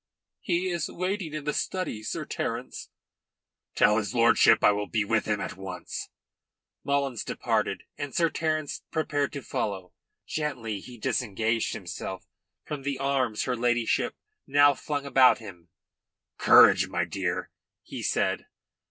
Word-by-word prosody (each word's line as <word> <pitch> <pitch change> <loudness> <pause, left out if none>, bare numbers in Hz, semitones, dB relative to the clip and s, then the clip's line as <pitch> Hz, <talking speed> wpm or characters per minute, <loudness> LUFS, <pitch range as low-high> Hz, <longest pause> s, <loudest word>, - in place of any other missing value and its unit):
"He 180 +1 0
is 170 -3 -2
waiting 185 -3 -3
in 155 - -4
the 150 0 -1
study, 185 - -2
Sir 110 - -4
Terence." - - -4 0.9
"Tell 105 0 +4
his 110 +3 -4
lordship 115 0 +5
I - - +7
will 105 0 -2
be 110 -3 0
with 110 +1 +1
him 105 -1 0
at - - -5
once." 95 -1 -6 0.7
Mullins 140 -4 0
departed, - - -1 0.2
and 145 -1 -4
Sir 165 +4 +2
Terence 155 -2 -2
prepared 145 -3 -1
to 140 - -6
follow. 95 -4 -3 0.3
Gently 125 -9 -3
he 120 +5 -11
disengaged 115 -2 -1
himself - - -6 0.4
from 150 -2 -5
the 140 0 -2
arms 130 -5 0
her 125 - -1
ladyship 120 -1 +1 0.3
now 145 +1 +6
flung 145 +1 -4
about 135 -2 +6
him. 90 -7 -12 0.7
"Courage, - - +7
my - - -1
dear," 90 -3 -3 0.3
he - - -7
said. - - 0
130 Hz, 140 wpm, -27 LUFS, 110-145 Hz, 0.9 s, I